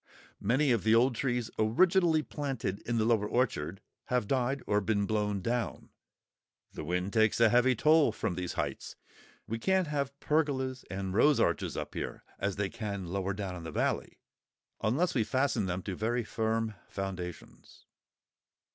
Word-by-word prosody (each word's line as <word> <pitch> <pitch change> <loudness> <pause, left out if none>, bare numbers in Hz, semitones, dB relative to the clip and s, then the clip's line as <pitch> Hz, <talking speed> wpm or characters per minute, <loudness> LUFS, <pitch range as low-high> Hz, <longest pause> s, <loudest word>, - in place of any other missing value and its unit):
Many 135 +3 +2
of 115 -5 +2
the 110 +1 +5
old 125 +3 +4
trees 120 -1 -1
originally 165 - +4
planted 130 -11 -3
in 120 0 0
the 110 - +2
lower 110 -3 +2
orchard 100 - -1 0.2
have 125 -4 0
died 130 +2 0
or 105 0 +2
been 100 0 +1
blown 105 -1 0
down; 120 +2 -2 0.8
the - - -6
wind 90 +4 -2
takes 110 0 +3
a 115 -1 +6
heavy 125 +2 +4
toll 155 +1 +5
from 100 - -2
these 90 0 -4
heights; 75 -6 -4 0.5
we 115 +1 -4
can't 190 +7 +2
have 140 -2 -3
pergolas 135 -4 0
and 95 -1 -3
rose 145 +8 +4
arches - - 0
up - - -4
here, - - -5 0.2
as 100 -2 -1
they 100 0 0
can 100 -4 -5
lower 95 +1 -1
down 95 -3 -4
in 85 - -7
the 80 - -5
valley, - - -1 0.6
unless 135 +11 +1
we 115 - +2
fasten 130 -4 0
them 90 0 -3
to 100 - -4
very 120 +5 0
firm 110 0 -1 0.2
foundations. 95 -3 -7
115 Hz, 165 wpm, -31 LUFS, 100-130 Hz, 0.8 s, a